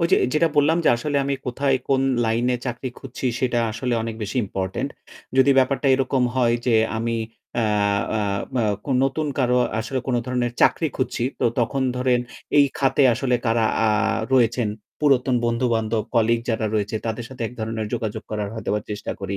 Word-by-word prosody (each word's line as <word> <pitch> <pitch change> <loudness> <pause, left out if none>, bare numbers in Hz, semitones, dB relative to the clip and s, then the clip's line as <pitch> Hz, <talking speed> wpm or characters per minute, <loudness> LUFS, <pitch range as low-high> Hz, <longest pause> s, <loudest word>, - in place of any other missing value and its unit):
ওই 170 - +3
যে - - +7 0.2
যেটা 165 +2 +3
বললাম, 155 +4 +4
যে - - +5
আসলে 145 +4 -2
আমি 140 - 0
কোথায় 135 +2 +1
কোন 135 -1 +3 0.2
লাইনে 120 +2 +1
চাকরি 125 +1 -3
খুঁজছি 130 0 -5
সেটা 125 -2 +1
আসলে 120 +2 -2
অনেক 115 -1 -4
বেশি 105 +4 -4
ইম্পোর্টেন্ট। 95 -1 -3 0.5
যদি 135 +1 +6
ব্যাপারটা 130 +1 +2
এরকম 130 -1 +1
হয় 120 -2 +3
যে, 120 - +3 0.2
আমি 115 +1 -1 0.4
অ্যা 115 - +2 0.5
অ্যা 110 -1 0 0.3
ম - - -1 0.3
কোন 135 - -1
নতুন 150 +3 -1
কারো 125 -1 +2 0.2
আসলে 130 +4 -3
কোন 130 - 0
ধরনের 125 -1 -1
চাকরি 160 - +3
খুঁজছি 130 -2 -2 0.2
তো, - - +3
তখন 130 +4 0
ধরেন 125 -1 +2 0.4
এই 145 - +8
খাতে 140 +1 +2
আসলে 125 +1 0
কারা 115 0 +2 0.2
আ - - +3 0.4
রয়েছেন, 120 -2 +3 0.3
পুরাতন 135 -3 +3
বন্ধু-বান্ধব 115 -2 0
কলিগ 115 0 +3
যারা 110 -1 0
রয়েছে 105 +1 -1
তাদের 115 +1 -3
সাথে 130 -2 -7
এক - - -13
ধরণের 110 0 -3
যোগাযোগ 110 -1 -3
করার 105 -2 -2
হয়তো 110 -2 -4 0.2
চেষ্টা 105 0 -4
করি। 100 0 -3
120 Hz, 175 wpm, -23 LUFS, 115-130 Hz, 0.5 s, এই